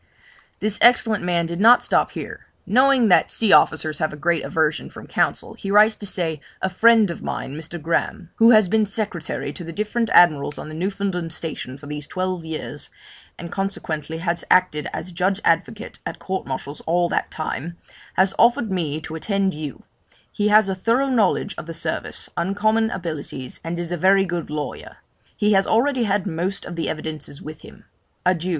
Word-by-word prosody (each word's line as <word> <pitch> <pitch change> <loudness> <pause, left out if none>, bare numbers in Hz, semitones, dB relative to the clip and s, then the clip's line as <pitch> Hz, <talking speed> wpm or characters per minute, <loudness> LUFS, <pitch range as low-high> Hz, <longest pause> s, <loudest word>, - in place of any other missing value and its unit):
This 210 -1 0
excellent 225 -4 +4
man 175 -1 +1
did 170 +1 -4
not 235 +4 +7
stop - - +1
here: - - -8 0.2
knowing 255 0 +4
that 180 - +5
sea 220 -4 +3
officers 155 -1 +3
have 155 - 0
a 150 - -8
great 170 +1 0
aversion 160 -1 0
from - - -11
counsel, - - -1
he 195 - -7
writes 210 +2 +6
to 205 - -6
say, 165 -5 -2 0.2
'A 190 - +1
friend 225 0 +5
of - - -8
mine, 135 - -4
Mr. 160 +2 -7
Graham, 165 +2 -2
who 225 +1 +6
has 215 -4 +6
been 215 +2 +2
secretary 195 -8 -3
to 175 - -8
the 165 - -7
different 215 +5 -1
Admirals 150 -4 +4
on - - -7
the - - -8
Newfoundland 185 -1 -2
station 155 -5 -6
for 145 - -13
these 150 0 -5
twelve 185 -2 -3
years, 160 -1 -6 0.5
and 170 0 -8
consequently 160 -5 -3
has 170 +1 -2
acted 180 -5 +3
as 180 - -6
judge 185 +3 0
advocate 205 +7 0
at - - -5
courts 190 0 -4
martial 135 +2 -5
all 175 +1 +2
that - - -1
time, 160 +1 -5 0.4
has 190 +1 +3
offered 235 -2 +4
me 160 -5 -1
to 155 - -8
attend 195 +3 0
you; 150 -3 -7 0.5
he 210 - 0
has 210 -1 +5
a 190 - 0
thorough 230 +8 +1
knowledge 210 -4 +1
of 155 - -9
the 165 - -6
service, 165 - -4
uncommon 215 +5 +1
abilities, 155 - -5
and 165 +1 -4
is 175 0 -3
a 175 - -1
very 195 +3 +4
good 175 -2 -4
lawyer. 150 -3 -6 0.4
He 210 0 +3
has 195 0 +3
already 250 +2 +2
had 200 -2 0
most 185 +2 -3
of 175 - -7
the 165 - -2
evidences 155 -2 -6
with 155 0 -9
him. - - -15 0.4
Adieu! 180 -1 +1
180 Hz, 185 wpm, -22 LUFS, 160-210 Hz, 0.5 s, not